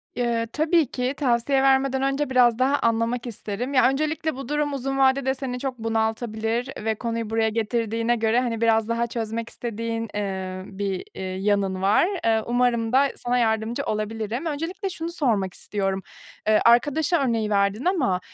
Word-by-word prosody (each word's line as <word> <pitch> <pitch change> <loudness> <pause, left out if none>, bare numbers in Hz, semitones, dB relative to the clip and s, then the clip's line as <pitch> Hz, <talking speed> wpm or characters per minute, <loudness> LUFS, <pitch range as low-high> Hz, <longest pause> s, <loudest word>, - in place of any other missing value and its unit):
Iıı, 235 -1 0
tabii 320 0 +3
ki. 255 +1 -1
Tavsiye 265 0 +2
vermeden 265 0 +3
önce 275 +1 0
biraz 245 -2 +4
daha 275 +2 +3
anlamak 230 +1 0
isterim. 235 +4 -4
Ya, 255 0 +5
öncelikle 310 +2 -1
bu 275 +1 -7
durum 295 -1 0
uzun 270 0 -2
vadede 265 0 +3
seni 255 -2 -4
çok 260 -3 -4
bunaltabilir 225 +1 -1 0.2
ve 220 -1 +1
konuyu 230 -1 -3
buraya 225 0 +1
getirdiğine 230 +1 0
göre, 225 +1 +2
hani, 235 -3 -2
biraz 225 -1 +3
daha 235 +1 0
çözmek 230 0 -4
istediğin, 230 -1 -4
ııı, 190 -2 -3
bir, 195 -2 -2
ııı, 190 - -4 0.2
yanın 195 -2 0
var. 205 - +4 0.2
Iıı, 220 -1 +2
umarım 240 -1 +1
da 275 +1 +5
sana 245 +1 0
yardımcı 220 0 0
olabilirim. 220 +5 -3
Öncelikle 330 +6 -3
şunu 335 -2 -5
sormak 220 - 0
istiyorum, 195 -2 -2 0.5
ııı, 215 - +5
arkadaş 290 +8 +4
örneği 230 -8 +1
verdin 200 - +1
ama, 275 - +1
235 Hz, 160 wpm, -24 LUFS, 220-270 Hz, 0.5 s, Ya